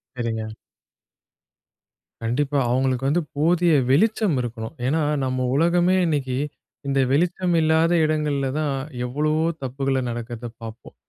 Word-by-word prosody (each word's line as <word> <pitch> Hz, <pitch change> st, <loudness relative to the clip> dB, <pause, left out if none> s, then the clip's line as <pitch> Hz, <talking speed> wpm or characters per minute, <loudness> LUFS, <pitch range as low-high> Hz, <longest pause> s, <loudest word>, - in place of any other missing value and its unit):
சரிங்க. 115 Hz, -3 st, -3 dB, 1.8 s
கண்டிப்பா. 140 Hz, +5 st, 0 dB
அவங்களுக்கு 130 Hz, +1 st, +1 dB
வந்து 170 Hz, +4 st, +2 dB, 0.2 s
போதிய 170 Hz, +2 st, +3 dB, 0.2 s
வெளிச்சம் 205 Hz, -, +3 dB
இருக்கணும். 115 Hz, +1 st, -5 dB
ஏன்னா, 155 Hz, +5 st, +1 dB, 0.2 s
நம்ப 130 Hz, 0 st, -1 dB
உலகமே 175 Hz, +4 st, +3 dB
இன்னைக்கு 135 Hz, -5 st, -1 dB, 0.5 s
இந்த 135 Hz, 0 st, +1 dB
வெளிச்சம் 175 Hz, +3 st, +1 dB
இல்லாத 160 Hz, +2 st, +3 dB
இடங்கள்ல 150 Hz, -3 st, 0 dB
தான் 145 Hz, -3 st, 0 dB, 0.3 s
எவ்வளவோ 150 Hz, +5 st, 0 dB, 0.2 s
தப்புகள 135 Hz, +1 st, -1 dB
நடக்குறத 120 Hz, 0 st, -5 dB
பார்ப்போம். 115 Hz, 0 st, -10 dB
140 Hz, 110 wpm, -23 LUFS, 125-160 Hz, 1.8 s, போதிய